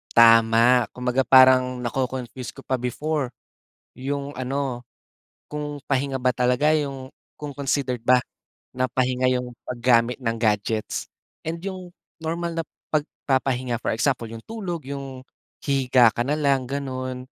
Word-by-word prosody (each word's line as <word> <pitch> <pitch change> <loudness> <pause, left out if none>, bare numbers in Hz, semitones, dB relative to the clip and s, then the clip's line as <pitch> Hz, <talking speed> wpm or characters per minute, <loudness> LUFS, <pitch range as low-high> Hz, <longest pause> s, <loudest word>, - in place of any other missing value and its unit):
Tama, 115 +1 +6
kumbaga 125 +1 0
parang 130 -1 +6
naco-confuse 125 0 -3
ka - - -15
pa 130 - -1
before, 130 +2 -2 0.7
yung 140 +2 -4
ano, 130 -1 -3 0.7
kung 145 -1 -5
pahinga 135 0 -1
ba 125 -1 +2
talaga 125 +4 +2
yung 140 -4 -2 0.2
kung 150 -1 -7
considered 135 -2 -1
ba 125 +2 +3 0.5
na 130 - +1
pahinga 130 0 0
yung 125 -1 -3
paggamit 120 0 +2
ng 115 -2 -1
gadgets 110 -1 -1 0.4
and 165 - -2
yung 185 -2 -5 0.3
normal 170 +1 -3
na - - -3 0.3
pagpapahinga, 130 -5 -1
for - - -4
example 120 -1 0
yung 115 0 -9
tulog, 185 - -5
yung 135 -2 -7 0.4
hihiga 130 -4 +4
ka - - -4
na 140 +5 +1
lang 140 -4 +1
ganon. 130 -2 -4
130 Hz, 130 wpm, -24 LUFS, 125-140 Hz, 0.7 s, Tama